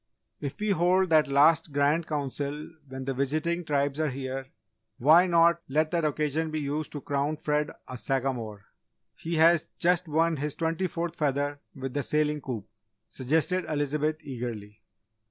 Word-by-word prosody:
"If 140 -2 -5
we 210 0 0
hold 185 0 +2
that 155 -1 +5
last 145 +3 +4
Grand 145 +4 +1
Council 145 +1 -3 0.2
when 130 0 -6
the 135 - -1
visiting 155 +6 -1
Tribes 140 -1 0
are 155 -1 +1
here 135 0 -5 0.5
why 160 +8 +6
not 170 -1 +4
let 155 +3 +1
that 170 -2 0
occasion 150 +1 -1
be 155 0 -2
used 150 +1 -3
to 145 - -5
crown 145 +2 -1
Fred 150 -1 0 0.2
a 125 - -7
Sagamore? 120 -7 -2 0.5
He 165 +1 -4
has 165 0 +5
just 175 0 +2
won 160 +1 +1
his 145 +1 -3
twenty 165 +3 -1
fourth 170 0 -4
feather 145 -1 0 0.2
with 135 -1 -5
the 145 - 0
sailing 150 +1 0
coup," 120 -7 -5 0.5
suggested 160 +7 0
Elizabeth, 150 +1 -1
eagerly. 115 -6 -7
150 Hz, 155 wpm, -28 LUFS, 135-160 Hz, 0.5 s, why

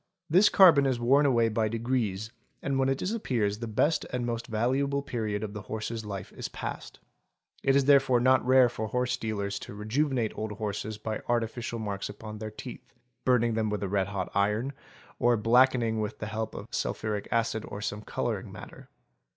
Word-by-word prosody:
This 190 +5 +6
carbon 160 -8 +7
is 130 -3 0
worn 135 +5 +4
away 120 -4 +3
by 110 0 0
degrees 110 -3 -2 0.3
and 135 -1 0
when 135 0 +2
it 135 - +1
disappears 125 - -1
the 115 - -4
best 145 +9 +1
and 125 -1 -3
most 120 -1 -3
valuable 135 +5 0
period 110 -6 -3
of 105 -1 -5
the 105 - -6
horse's 110 +2 -4
life 100 -3 -6
is - - -5
passed. - - -6 0.6
It 135 - +3
is 140 -1 +4
therefore 135 -3 +5
not 130 +2 +4
rare 130 0 +6
for 110 -2 -4
horse 125 +2 0
dealers 100 -4 -3
to - - -9
rejuvenate 120 +2 0
old 110 -1 -4
horses 105 0 -4
by 110 0 -4
artificial 120 0 -1
marks 100 -3 -4
upon 105 +1 -8
their 110 0 -5
teeth, 120 +4 -10 0.3
burning 120 -2 +3
them 110 -1 0
with 105 -1 -2
a - - -1
red 95 -1 +1
hot 100 -3 -4
iron, 105 +7 +1 0.5
or 120 0 +4
blackening 115 0 +3
with 105 0 -3
the - - -5
help 110 +1 -4
of - - -6
sulphuric 105 -2 -2
acid 115 -1 0
or 100 - -6
some 105 0 -4
colouring - - -3
matter. - - -11
115 Hz, 185 wpm, -28 LUFS, 105-130 Hz, 0.6 s, carbon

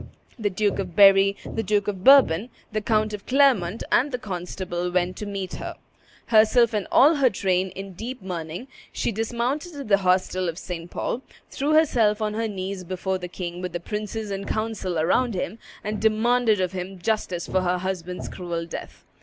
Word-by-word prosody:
The 210 -2 +1
Duke 200 +1 0
of 180 -3 -4
Berry, 195 0 +6
the 225 - -3
Duke 210 -1 0
of 190 -3 -3
Bourbon, 245 -6 +6 0.2
the 215 0 -1
Count 215 0 +1
of 205 -1 -7
Clermont, 250 -8 +3
and 280 +4 +3
the 250 - -1
constable 180 -3 -4
went 180 0 0
to 210 - -5
meet 195 -2 -4
her. - - -6 0.5
Herself 225 +1 +5
and 210 -2 -1
all 300 +4 +6
her 270 -3 +4
train 185 -2 0
in 195 0 -7
deep 240 +7 -6
mourning, 175 +3 -6 0.2
she - - -1
dismounted 240 - -2
at 280 -6 -7
the 200 - +6
hostel 185 -1 +1
of 165 - -6
St. 175 -2 -6
Paul, 245 - -3 0.3
threw 290 +3 0
herself 230 -9 +3
on 215 -1 -1
her 225 +1 -1
knees 190 -2 -5
before 185 +1 -3
the 180 - -5
king 175 0 -6
with 180 -1 -5
the 175 - -2
princes 210 +3 -4
and 195 0 -4
council 215 -5 -2
around 200 +8 +2
him, 190 +4 -3 0.2
and 210 +1 -3
demanded 220 0 +3
of 185 -2 0
him 190 +1 -6
justice 180 -3 -1
for 185 - 0
her 180 0 +1
husband's 180 -1 -4
cruel 170 -2 -4
death. 165 - -9
200 Hz, 185 wpm, -24 LUFS, 180-225 Hz, 0.5 s, Berry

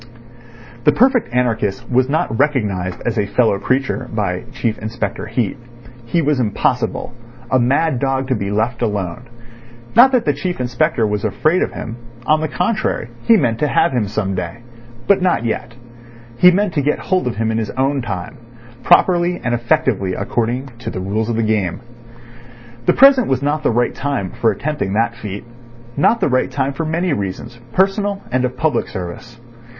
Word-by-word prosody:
The 150 - +6
perfect 245 - +3
anarchist 120 -2 0
was 130 +1 +2
not 140 -6 0
recognised 105 -11 0
as 120 -2 0
a 100 - 0
fellow 110 -2 +2
creature 130 +2 -1
by 100 -5 -2
Chief 120 -4 -2
Inspector 110 -2 -4
Heat. 115 -1 -1 0.5
He 165 +7 +1
was 145 -2 +1
impossible—a 120 +2 -2
mad 135 +3 +2
dog 135 0 0
to 130 - +2
be 100 -3 -3
left 110 +4 -1
alone. 105 +1 -2 0.7
Not 250 +4 +8
that 245 -2 +2
the - - +2
Chief 180 -5 -3
Inspector 125 +1 +1
was 105 -1 -1
afraid 155 - +1
of - - -1
him; 115 +1 -6 0.3
on 155 0 +3
the 155 - 0
contrary, 180 - -1 0.2
he 230 - +7
meant 120 - 0
to 150 - +2
have - - +2
him 120 -5 0
some 100 -1 -2
day. 90 +5 -5 0.4
But 200 -2 +3
not 180 -10 +1
yet; 115 +1 -3 0.6
he 180 +9 +7
meant 190 0 +1
to 145 - +1
get 150 +2 +1
hold 185 -6 0
of 120 - -2
him 110 +1 0
in 110 - 0
his 110 - -3
own 135 +1 0
time, 100 0 -5 0.4
properly 175 +1 +3
and 120 - 0
effectively 120 -7 +1
according 120 +6 -2
to 120 - -5
the - - -5
rules 105 +4 -2
of 115 - 0
the 115 - +1
game. 105 -5 0 1.1
The - - +5
present 270 -3 +6
was 135 0 0
not 150 +2 0
the - - +1
right 120 +1 +1
time 135 -10 -2
for 115 - +1
attempting 145 -2 -3
that 115 +2 +1
feat, 105 -4 -7 0.5
not 220 +11 +3
the - - +3
right 130 -1 +1
time 135 +1 -1
for 160 +4 -3
many 170 +1 0
reasons, 110 +2 -5
personal 200 +1 +1
and 130 0 +1
of 125 0 -4
public 140 -3 0
service. 95 +7 -7
125 Hz, 180 wpm, -18 LUFS, 110-150 Hz, 1.1 s, Not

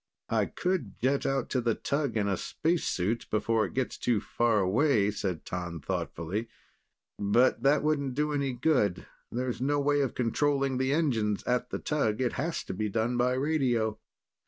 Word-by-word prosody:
"I - - +2
could 180 - -2
jet 135 +3 +1
out 135 -2 -1
to 130 - +1
the 115 -2 +1
tug 140 -4 -1
in 100 -1 +1
a 100 - +1
spacesuit, 120 - -1
before 110 +1 +1
it - - -8
gets 130 -1 -2
too 120 -4 +2
far 115 +1 +1
away," 105 +2 +3
said 95 -5 -3
T'an 90 -2 -4
thoughtfully. 90 +9 -3 0.7
"But 105 +5 +3
that 140 +2 +3
wouldn't 140 -4 0
do 150 +1 0
any 140 -2 0
good. 125 - +1 0.3
There's 125 0 -2
no 145 +2 +1
way 145 0 +2
of 135 - -1
controlling 135 +2 +1
the 130 +1 +1
engines, 115 -10 +1
at 125 0 0
the - - -3
tug. 130 -8 0
It 125 -2 0
has 165 +5 -2
to - - -5
be 105 +3 -2
done 115 +4 0
by 125 +1 +2
radio." 130 -6 +1
125 Hz, 175 wpm, -29 LUFS, 110-140 Hz, 0.7 s, away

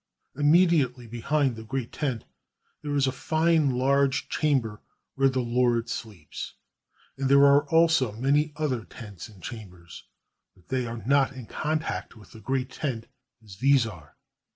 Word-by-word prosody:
Immedi 160 +2 +4
ately 125 -1 -8
behind 130 +3 0
the 110 - -9
great 130 +1 -4
tent 130 -7 -3 0.6
there 145 -1 -3
is 140 -1 +3
a 130 - +1
fine 160 +2 +1
large 135 +2 +1
chamber 125 -9 0 0.3
where 135 0 +3
the 130 -1 -1
lord 120 -1 +1
sleeps; 100 - -7 0.6
and 135 -1 0
there 140 +1 +7
are 140 +1 +4
also 165 -7 +3
many 140 +6 +1
other 135 -7 -2
tents 105 -3 -10
and 95 -5 -17
chambers, 90 -7 -10 0.5
but 90 - -26
they 130 -2 -1
are 115 -2 -6
not 140 +1 +3
in 130 -3 -9
contact 155 +3 -3
with 105 -2 -16
the 110 - -12
great 130 0 -2
tent 120 -7 -4 0.4
as 100 -3 -13
these 135 0 +4
are. 80 -9 -10
130 Hz, 155 wpm, -26 LUFS, 115-140 Hz, 0.6 s, there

